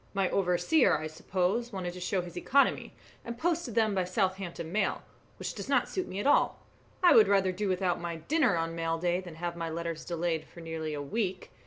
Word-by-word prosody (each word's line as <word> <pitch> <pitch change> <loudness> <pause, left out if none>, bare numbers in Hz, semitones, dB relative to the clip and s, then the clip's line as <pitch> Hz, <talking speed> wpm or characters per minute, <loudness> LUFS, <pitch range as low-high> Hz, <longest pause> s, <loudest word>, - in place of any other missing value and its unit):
"My 195 -2 +1
overseer, 190 - +3
I 155 - -5
suppose, 185 +8 -1
wanted 180 -3 -4
to 180 - -8
show 180 +1 0
his 175 -1 -10
economy, 275 +10 +2 0.3
and 235 0 -6
posted 330 -5 -1
them 220 -2 +3
by 190 - +1
the 180 - -4
Southampton 185 -4 -2
mail, 215 +3 0 0.3
which - - -4
does - - -7
not - - +3
suit 375 - -3
me 190 - -5
at - - -3
all. 285 - +4 0.5
I 355 - +8
would 220 - +7
rather 195 -2 +3
do 195 +2 -2
without 180 -2 0
my 170 -1 -3
dinner 245 - +1
on 165 0 -2
mail 165 0 -1
day 175 +2 0
than 175 -3 -10
have 170 +1 -4
my 165 -1 -3
letters 165 0 -4
delayed 170 -2 -2
for - - -14
nearly 160 -2 -4
a 145 - -4
week. 185 +3 -3
180 Hz, 215 wpm, -30 LUFS, 170-205 Hz, 0.5 s, I